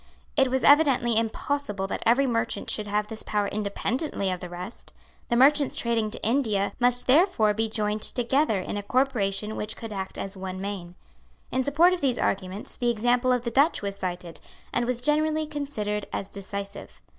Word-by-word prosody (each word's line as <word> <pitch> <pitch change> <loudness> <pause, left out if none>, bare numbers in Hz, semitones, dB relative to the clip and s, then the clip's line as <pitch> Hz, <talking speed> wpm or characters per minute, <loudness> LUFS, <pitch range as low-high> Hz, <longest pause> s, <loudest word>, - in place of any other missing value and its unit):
It 270 -3 +3
was 260 +1 0
evidently 275 -6 +5
impossible 225 -1 -1
that 195 - -4
every 250 +4 +4
merchant 230 -2 -1
should 210 -1 -1
have 210 +1 0
this 220 +1 -5
power 205 -1 -1
independently 210 - -2
of 180 - -3
the 180 -1 -7
rest. 180 +5 -9 0.4
The 235 - +2
merchants 280 +3 +4
trading 230 -2 0
to - - -6
India 220 -5 +1
must 245 0 +3
therefore 260 - +4
be 220 +1 -1
joined 210 0 -1
together 245 -2 +1
in 185 - -4
a - - -2
corporation 215 -3 0
which 210 +1 -3
could 225 -2 -7
act 190 -1 -5
as 195 +1 -5
one 185 0 -6
man. 190 -3 -5 0.6
In 260 - +1
support 320 +7 +4
of 365 - -3
these 260 -4 +1
arguments 190 +1 -2
the 240 - +1
example 245 +2 +2
of 250 -1 +1
the 235 - -2
Dutch 280 +1 +3
was 200 -1 -3
cited, 180 -3 -5 0.3
and 240 - +1
was 245 0 -1
generally 310 +3 +2
considered 275 -9 -3
as 195 - -4
decisive. 200 0 -7
225 Hz, 180 wpm, -26 LUFS, 200-265 Hz, 0.6 s, evidently